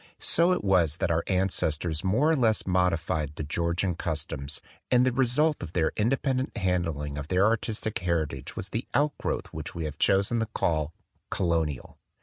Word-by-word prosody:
So 170 +2 +3
it 180 - 0
was 90 -6 +3
that 90 - 0
our 85 0 +1
ancestors 85 -4 0
more 130 +12 +3
or - - +4
less 115 -6 +2
modified 85 -5 0
the 80 - -4
Georgian 85 +4 0
customs; 75 -3 -3 0.3
and 125 0 +4
the 130 - +3
result 135 +5 +2
of 85 -1 -7
their 80 -3 +2
independent 130 +3 0
handling 85 -7 -1
of 70 - -6
their 95 +3 +3
artistic 110 -1 -1
heritage 80 -7 -2
was 95 - -6
the 115 +5 -3
outgrowth 145 0 -1
which - - -6
we 85 -2 -3
have 75 -1 -6
chosen 100 +4 +3
to 115 - -1
call 80 -7 -1 0.2
" - - -45
Colonial." 80 -7 -1
90 Hz, 170 wpm, -27 LUFS, 80-115 Hz, 0.3 s, or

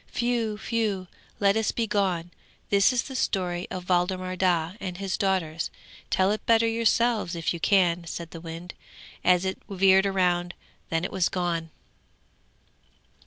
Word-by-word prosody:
Whew! 235 -3 0
whew! 210 -4 -1 0.3
Let 200 0 +4
us 220 -1 +1
be 230 - -1
gone! 185 -5 0 0.4
This 200 +4 +5
is 250 -2 0
the 265 - -8
story 180 -6 -1
of 180 -1 -6
Waldemar 185 +1 0
Daa 175 -2 +1
and 180 -2 -5
his 195 -1 -2
daughters. 175 -5 -1 0.4
Tell 190 +1 +3
it 215 - -2
better 230 0 +5
yourselves, 230 -4 +1
if 165 0 -1
you 170 - -5
can,' 175 -2 +2
said 170 0 -6
the 165 - -8
wind, 165 +2 -8 0.5
as 180 0 +4
it 190 0 -3
veered 190 0 +4
round. 175 -2 +1 0.3
Then 165 +1 0
it - - -4
was 185 -2 +1
gone. 170 -3 -2
185 Hz, 155 wpm, -26 LUFS, 175-205 Hz, 0.5 s, This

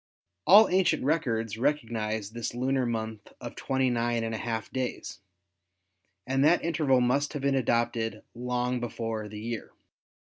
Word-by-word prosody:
All 210 +4 +9
ancient 180 -4 +2
records 115 -7 0
recognise 110 -7 -1
this 120 0 -4
lunar 130 0 0
month 110 -2 -4
of - - -8
twenty 130 -1 0
nine 120 -1 0
and 115 0 -3
a - - -2
half 115 -3 -3
days, 130 -8 -4 1.1
and 135 +1 +1
that 165 +3 +4
interval 150 -6 +2
must 135 +4 +1
have 145 - -4
been 140 0 +2
adopted 115 -3 0
long 125 +1 -1
before 115 -2 -4
the 105 0 -8
year. 115 +1 -5
120 Hz, 145 wpm, -28 LUFS, 115-135 Hz, 1.1 s, All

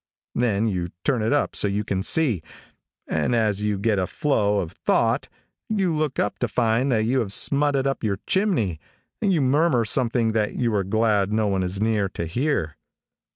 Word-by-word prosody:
Then 110 -3 +1
you 90 -5 -2
turn 125 -5 +1
it 110 - 0
up 145 0 +1
so - - +1
you 100 +1 -1
can 95 -2 -2
see, 120 - +1 0.7
and 120 - 0
as 105 -3 +1
you 105 -1 0
get 105 0 +1
a 90 - -1
flow 105 -8 +1
of 85 -4 -4
thought - - 0 0.4
you 195 -6 +1
look 150 -3 -1
up 105 - -1
to 125 - 0
find 115 +4 +1
that 110 -2 +2
you 130 +3 +1
have 110 -5 -2
smutted 140 +3 +2
up 135 -2 -2
your 100 -3 0
chimney, 155 - 0 0.4
and 200 - +2
you 165 -5 +2
murmur 135 -2 +2
something 115 0 +1
that 110 -1 -1
you 120 -3 0
are 100 -2 +1
glad 105 0 +1
no 110 0 +1
one 95 -2 0
is 90 +1 -2
near 105 -2 +1
to 85 - -5
hear. 85 - -1
110 Hz, 195 wpm, -23 LUFS, 100-135 Hz, 0.7 s, that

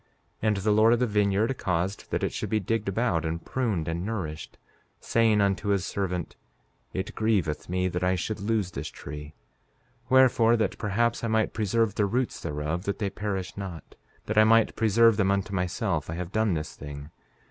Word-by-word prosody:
5:11 110 - 0
And 105 -2 +2
the 100 +2 +1
Lord 110 +2 +5
of 120 - +2
the 125 - +3
vineyard 105 +3 +1
caused 90 +2 -2
that - - -1
it - - -1
should - - -3
be 110 - +1
digged 105 +1 -1
about, 100 -5 0
and 85 +1 -3
pruned, 110 -11 -1
and 85 +1 -2
nourished, 90 -8 -5 0.4
saying 110 -2 +2
unto 100 +1 0
his 100 -2 +1
servant: 90 -4 -3 0.6
It 95 +2 -4
grieveth 95 -10 0
me 90 +1 0
that 90 0 -2
I 90 +1 +2
should 105 +4 -3
lose 105 -2 -1
this 70 0 -5
tree; 75 +1 -9 0.7
wherefore, 120 -3 +5
that 110 - -1
perhaps 115 +3 0
I - - 0
might 110 -1 +1
preserve 110 0 +1
the 105 -1 +1
roots 125 +5 -1
thereof 75 +3 -3
that 100 - -1
they 100 -3 -2
perish 95 -3 -4
not, 95 -5 -7 0.3
that 110 0 +2
I - - +8
might 115 +1 +4
preserve 115 0 +4
them 100 -3 +2
unto 100 0 0
myself, 90 - -1
I 80 - -3
have 90 +1 -5
done 110 -4 +1
this 75 0 -5
thing. 75 +1 -9
100 Hz, 190 wpm, -27 LUFS, 90-110 Hz, 0.7 s, I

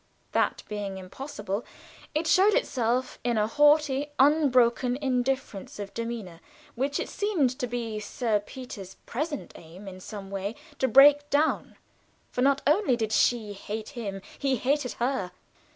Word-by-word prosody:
That - - +1
being 205 -2 -4
impossible, 205 +1 -5 0.5
it 310 +2 +1
showed 385 +6 +5
itself 250 - 0
in 240 -2 +1
a 210 - +3
haughty, 295 +2 +3
unbroken 255 -4 +4
indifference 260 -6 -2
of 200 -1 -6
demeanor 230 -7 -5 0.3
which 275 +4 -1
it - - -2
seemed 370 - +1
to 250 - -1
be 230 -3 -3
Sir 215 0 0
Peter's 205 -4 -9
present 295 +4 -4
aim 175 +5 -12
in 185 -1 -8
some 195 0 -8
way 200 +3 -3 0.2
to 265 - +2
break 290 +4 +7
down, 300 +2 +1 0.6
for 250 - -2
not 275 +1 +3
only 300 - +3
did 220 -2 -2
she 220 -2 +2
hate 210 +2 -6
him 200 -7 -6 0.2
he 275 -2 +1
hated 260 +1 0
her. 245 -6 -1
245 Hz, 145 wpm, -27 LUFS, 210-280 Hz, 0.6 s, break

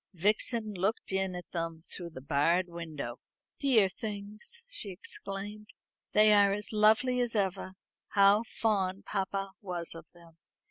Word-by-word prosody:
Vixen 215 +4 +1
looked 195 +4 0
in 190 -1 0
at 180 - -8
them 165 -2 -3
through 175 -2 -5
the 145 -5 -10
barred 165 +6 +2
window. 160 -8 -6 0.4
"Dear 240 -8 +5
things," 210 - -6
she 220 - -2
exclaimed; 200 +2 -7 0.5
"they 215 0 +7
are 200 -1 +6
as 210 +2 -4
lovely 220 +4 +4
as 240 -2 0
ever. 190 -2 -1 0.3
How 200 +1 +5
fond 200 -4 -1
papa 195 0 -2
was 175 -3 -4
of 165 -1 -11
them." 170 -1 -18
195 Hz, 140 wpm, -31 LUFS, 175-215 Hz, 0.5 s, they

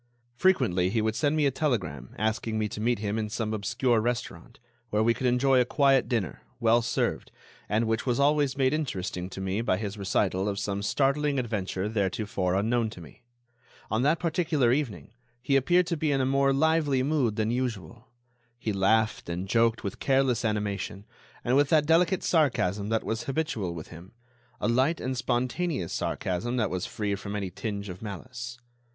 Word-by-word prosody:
Frequently 120 - +2
he 115 - 0
would 110 0 0
send 150 +3 +1
me 155 -2 +2
a 140 - +3
telegram 95 - -2
asking 110 +1 -1
me 110 -1 0
to 105 - -6
meet 120 +1 +2
him 105 +1 -2
in 105 -1 -2
some 110 0 -2
obscure 120 +3 +1
restaurant, 120 0 -4 0.3
where 105 0 +1
we 115 +1 +4
could 125 +3 -1
enjoy 125 +1 +4
a - - +5
quiet 135 +1 +3
dinner, 110 - -2 0.2
well 115 +1 +4
served, 115 - -1 0.4
and 110 +3 +2
which 110 0 0
was 120 0 +1
always 145 -1 +2
made 130 0 +2
interesting 95 - -3
to 95 - -8
me 95 +3 -1
by 95 -5 +1
his 105 0 -5
recital 95 0 0
of 100 - -3
some 100 0 -2
startling 140 +6 +1
adventure 105 -5 -2
theretofore 100 -3 -1
unknown 115 +3 +1
to 100 - -11
me. 80 +7 -14 0.7
On 110 +2 +1
that 150 +5 +3
particular 160 -7 +1
evening 130 -6 -3 0.3
he 135 +3 0
appeared 175 +7 +4
to 170 -1 -2
be 150 0 0
in 135 - +2
a 130 - +2
more 135 +1 +3
lively 145 -2 +2
mood 135 -7 +1
than 110 +1 0
usual. 120 -2 -4 0.5
He 110 -3 -2
laughed 110 +1 +1
and 90 +3 -3
joked 115 +2 +2
with 100 - -5
careless 135 -3 +2
animation, 105 -2 -2 0.4
and 125 +1 +2
with 145 0 +4
that 155 -2 +4
delicate 170 +3 +3
sarcasm 105 - +1
that 110 0 0
was 115 +1 -3
habitual 125 - -2
with 80 - -8
him—a 120 +8 -10
light 130 +8 +2
and 130 +1 -2
spontaneous 125 - -1
sarcasm 120 +8 -2
that 110 - 0
was 90 -1 -2
quite - - -9
free 105 -2 -2
from 100 +1 -5
any 100 -3 -3
tinge 100 +1 -4
of 90 -1 -8
malice. 120 +3 -7
115 Hz, 185 wpm, -27 LUFS, 100-135 Hz, 0.7 s, a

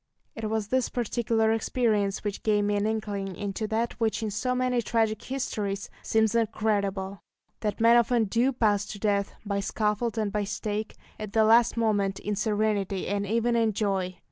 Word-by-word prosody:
It 220 -1 -4
was 215 -1 -2
this 260 -2 +1
particular 230 -2 0
experience 215 -3 0
which 205 -2 -3
gave 210 -1 +2
me 205 0 +1
an 205 +1 +1
inkling 205 -3 -3
into 205 +3 -3
that 225 +2 -1
which 225 -1 0
in 215 - -2
so 250 +5 -1
many 250 -1 +1
tragic 225 -2 0
histories 205 -7 -3
seems 220 -1 +2
incredible 200 -4 -1 0.4
that 210 -2 -2
men 230 +1 +6
often 235 0 +3
do 235 +6 +2
pass 210 -5 +1
to 210 - -7
death, 200 -1 0
by 200 -1 -1
scaffold 210 +3 -1
and 215 -2 0
by 210 0 0
stake, 210 +1 -3 0.2
at 215 -1 -6
the 220 - +4
last 230 +2 +5
moment, 205 -4 +1
in 210 0 -3
serenity 205 -2 0
and 200 +1 -1
even 230 +3 +1
in 225 -2 +2
joy. 190 -3 -1
215 Hz, 175 wpm, -27 LUFS, 200-230 Hz, 0.4 s, men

